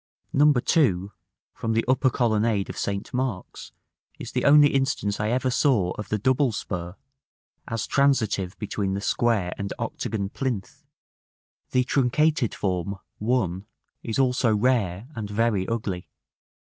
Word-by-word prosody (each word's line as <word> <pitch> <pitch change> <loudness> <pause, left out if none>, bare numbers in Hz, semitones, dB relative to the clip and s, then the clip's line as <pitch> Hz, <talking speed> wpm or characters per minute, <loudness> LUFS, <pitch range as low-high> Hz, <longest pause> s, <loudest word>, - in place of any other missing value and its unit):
No. 150 +2 +6
2, 120 - +2 0.4
from 115 - -2
the 115 - +1
upper 130 +1 +3
colonnade 110 -4 +1
of - - -12
St. 100 0 -3
Mark's, 125 -7 -4 0.5
is - - -7
the - - -1
only 145 0 +7
instance 135 -7 0
I 105 +1 0
ever 130 +2 +1
saw 120 - +2
of 105 - -6
the 105 - 0
double 130 +4 +2
spur, 90 -4 -5 0.7
as 115 -2 -2
transitive 110 -9 +1
between 100 -2 -2
the - - -2
square 105 -4 +1
and 100 0 -3
octagon 100 -3 -3
plinth; 120 -5 -4 0.9
the 125 - +2
truncated 140 +1 +1
form, 95 0 -2 0.2
1, 105 -5 -1 0.3
is 115 - -3
also 125 -4 +2
rare 105 -4 +1
and 110 -5 -5
very 105 -3 +1
ugly. 105 -6 -3
115 Hz, 135 wpm, -25 LUFS, 100-130 Hz, 0.9 s, only